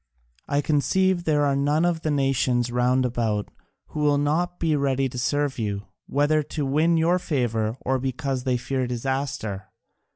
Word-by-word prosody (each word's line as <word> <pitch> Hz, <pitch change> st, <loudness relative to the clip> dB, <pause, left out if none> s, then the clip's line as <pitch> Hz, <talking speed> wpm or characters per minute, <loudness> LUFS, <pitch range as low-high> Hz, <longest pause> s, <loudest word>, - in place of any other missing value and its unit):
I 145 Hz, 0 st, +1 dB
conceive 175 Hz, +5 st, +1 dB
there 150 Hz, -2 st, +2 dB
are 140 Hz, -1 st, +2 dB
none 145 Hz, +4 st, +2 dB
of 170 Hz, -2 st, 0 dB
the 155 Hz, -, -1 dB
nations 135 Hz, -4 st, +1 dB
round 125 Hz, +1 st, +2 dB
about 115 Hz, -4 st, -1 dB, 0.4 s
who -, -, -6 dB
will 145 Hz, -1 st, +3 dB
not 160 Hz, +5 st, 0 dB
be 160 Hz, -2 st, +1 dB
ready 135 Hz, -1 st, +1 dB
to 125 Hz, -1 st, -6 dB
serve 145 Hz, +1 st, 0 dB
you, 100 Hz, -2 st, -2 dB, 0.2 s
whether 145 Hz, +2 st, +2 dB
to 150 Hz, 0 st, -4 dB
win 155 Hz, +5 st, +2 dB
your 170 Hz, +3 st, +3 dB
favour 115 Hz, -8 st, -1 dB
or 130 Hz, 0 st, 0 dB
because 135 Hz, 0 st, -2 dB
they 130 Hz, -2 st, +1 dB
fear 125 Hz, +1 st, -2 dB
disaster. 125 Hz, -4 st, -3 dB
140 Hz, 165 wpm, -24 LUFS, 125-150 Hz, 0.4 s, will